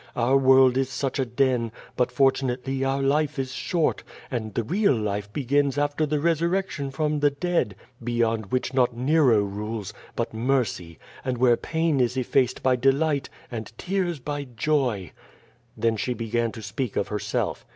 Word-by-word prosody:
Our 125 +3 +2
world 130 -1 +6
is 135 -1 +1
such 135 +1 -2
a 135 - +2
den, 120 -2 +1 0.2
but, 125 - +1
fortunately, 135 -1 +1
our 135 +1 0
life 150 +2 +1
is 130 -1 -2
short, 165 +2 0 0.3
and 110 -4 -3
the 115 - 0
real 185 - +2
life 105 -2 -3
begins 140 +3 +1
after 145 +1 +1
the 150 0 0
resurrection 170 -1 0
from 150 +2 -1
the 145 0 +4
dead, 145 - -1 0.3
beyond 115 -2 0
which 130 +4 -1
not 125 -2 +2
Nero 130 -4 +4
rules, 105 0 -5 0.2
but - - -2
Mercy, 115 -8 -1 0.3
and 130 -1 -2
w^here 120 -1 +3
pain 160 -3 0
is 125 +1 +1
effaced 130 0 +1
by 130 -1 +4
delight, 140 +2 +1 0.2
and 110 -3 -5
tears 185 -3 -1
by 145 +2 -4
joy.^^ 125 - -1 0.7
Then 115 -1 +1
she 125 +4 -2
began 115 0 -1
to 110 - -9
speak 110 +3 -3
of 100 - -1
herself. 105 -1 -2
130 Hz, 160 wpm, -25 LUFS, 115-145 Hz, 0.7 s, world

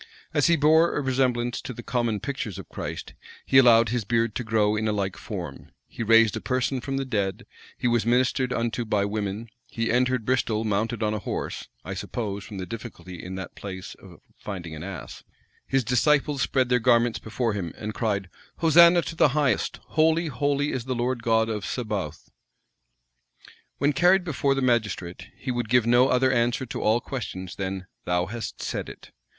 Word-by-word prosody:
As 145 - +3
he 170 - +5
bore 160 +2 +4
a - - +1
resemblance 125 -2 0
to 125 - -6
the 120 - -8
common 120 -4 -1
pictures 125 -8 -4
of - - -9
Christ, - - -6 0.3
he 135 - +6
allowed 115 -3 +6
his 120 0 -1
beard 115 +1 +1
to 120 - -3
grow 110 -2 +2
in 110 +1 -1
a - - +2
like 100 -2 -2
form: - - -7 0.2
he - - -9
raised 115 -1 +5
a - - -4
person 130 0 -1
from 135 +1 -3
the 135 - -1
dead:[] 100 -7 -2 0.3
he - - 0
was 120 -1 +2
ministered 125 +2 +2
unto 120 0 -1
by 105 -3 +1
women:[] 105 +1 -3 0.2
he 115 -1 -2
entered 125 -1 +1
Bristol 115 -3 +1
mounted 110 +2 -1
on 105 0 +1
a 105 - -2
horse, - - -4 0.2
(I - - -4
suppose, 100 -4 -4
from 100 +1 -9
the 95 - -4
difficulty 105 -5 -8
in 95 +1 -6
that 95 -2 -6
place 95 -2 -7
of - - -14 0.2
finding 90 -5 -6
an 75 - -7
ass:) 90 -2 -8 0.4
his 135 -1 +1
disciples 140 +3 +2
spread 130 -2 +1
their 125 0 +3
garments 120 -1 +3
before 110 +1 -2
him, 90 -5 -3
and 105 0 -5
cried, 100 -4 -1 0.3
"Hosanna 170 +1 +6
to 165 - -6
the 150 -3 +3
highest; 130 -8 +1
holy, 160 +1 +2
holy 145 +2 0
is 125 -3 -3
the 130 -1 -2
Lord 120 0 -1
God 115 -1 +2
of 105 -3 -3
Sabaoth." 105 - -4 1.5
When 145 +2 +2
carried 180 +6 +4
before 140 -4 0
the 135 - -1
magistrate, 110 -8 -1
he 130 - -4
would 120 -3 -2
give 125 -1 +4
no 120 +2 +5
other 130 +1 +3
answer 120 +1 +1
to 125 - -5
all 110 +3 +2
questions 95 -9 -6
than 95 -1 -4 0.2
"Thou 90 0 +1
hast 115 +4 -6
said - - -3
it." - - -12
120 Hz, 190 wpm, -25 LUFS, 105-130 Hz, 1.5 s, he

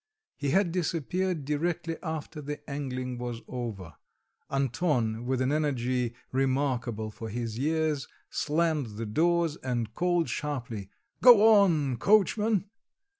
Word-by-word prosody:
He 145 -2 -2
had 185 +4 +3
disappeared 175 -1 -1
directly 165 +3 -1
after 160 -2 -5
the 145 +1 -7
angling 130 -3 -4
was 120 -1 -5
over. 110 -10 -5 0.6
Anton, 125 -4 0
with 130 0 0
an 130 +1 +1
energy 130 -5 0 0.2
remarkable 130 -5 0
for 110 +1 -7
his 115 0 -4
years, 155 -1 0 0.2
slammed 150 -8 0
the 115 - -3
doors, 165 +6 +1
and 120 -4 -3
called 175 +2 +1
sharply, 120 -9 -4 0.3
"Go 225 -3 +8
on, 150 -9 +2
coachman!" 210 - +2
145 Hz, 120 wpm, -28 LUFS, 120-165 Hz, 0.6 s, Go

